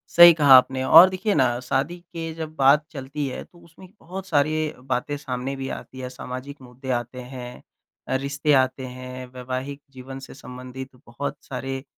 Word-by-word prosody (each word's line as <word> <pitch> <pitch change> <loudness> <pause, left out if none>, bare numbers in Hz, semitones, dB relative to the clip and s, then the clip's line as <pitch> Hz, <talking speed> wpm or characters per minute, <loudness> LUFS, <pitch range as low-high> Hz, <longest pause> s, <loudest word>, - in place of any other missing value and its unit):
सही 175 0 +11
कहा 145 -4 +6
आपने 130 +1 +2
और 165 +7 +9
देखिए 190 +3 -1
ना 120 -2 +2
शादी 140 +7 -1
के 165 -2 -7
जब 160 -1 -6
बात 140 +1 +5
चलती 140 0 -4
है 130 - -5
तो 175 - -21
उसमें 170 +3 -16
बहुत 190 +3 -8
सारी 150 -3 +2 0.4
बातें 130 +3 -1
सामने 135 -1 -4
भी 135 0 -5
आती 130 - -11
है। 125 -1 -5
सामाजिक 130 +2 -8
मुद्दे 130 +1 -11
आते 120 +1 -3
हैं, 125 -1 -9 0.5
अ, - - 0
रिश्ते 140 +2 0
आते 130 0 -3
हैं, 130 0 -8
वैवाहिक 130 +3 -5
जीवन 135 0 -9
से - - -12
संबंधित 130 0 -9 0.2
बहुत 140 +4 -5
सारे 135 0 -5
135 Hz, 175 wpm, -24 LUFS, 130-150 Hz, 0.5 s, सही